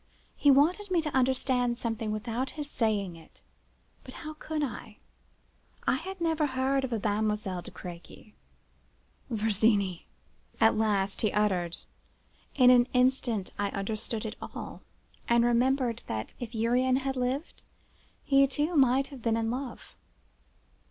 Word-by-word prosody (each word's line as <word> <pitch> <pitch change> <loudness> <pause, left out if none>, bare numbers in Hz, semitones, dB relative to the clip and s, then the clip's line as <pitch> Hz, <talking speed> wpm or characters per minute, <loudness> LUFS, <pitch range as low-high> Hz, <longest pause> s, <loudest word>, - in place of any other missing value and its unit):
He 290 - +3
wanted 330 +9 +4
me 360 -2 +2
to 300 -3 -3
understand 250 -2 +1
something 225 -2 -3
without 230 +4 -2
his 295 -1 -4
saying 210 -9 -1
it; 165 - -17 0.6
but - - -11
how 310 0 -7
could 310 0 -3
I? 220 -4 -6 0.9
I - - +2
had 380 +5 -7
never 320 -3 +1
heard 265 +1 0
of 260 - -3
a 230 - 0
Mademoiselle 210 -2 -1
de - - -10
Crequy. 180 +4 -11 1.0
"'Virginie!' 210 -4 +1 0.5
at 225 - +5
last 205 -3 0
he 215 - +2
uttered. 185 -5 0 0.8
In 250 -2 +7
an 245 -1 +5
instant 250 -5 +1
I 205 0 +1
understood 215 +3 -3
it 215 - -5
all, - - -7 0.5
and 235 0 +4
remembered 240 0 +2
that, 110 0 -4
if 240 -1 -6
Urian 245 +3 +2
had 270 0 -1
lived, 255 +5 -2 0.6
he 275 0 +5
too 295 +5 -1
might 270 -1 +4
have 275 -3 -10
been 225 0 +1
in 225 0 0
love. 255 -1 -6
240 Hz, 140 wpm, -29 LUFS, 215-270 Hz, 1.0 s, In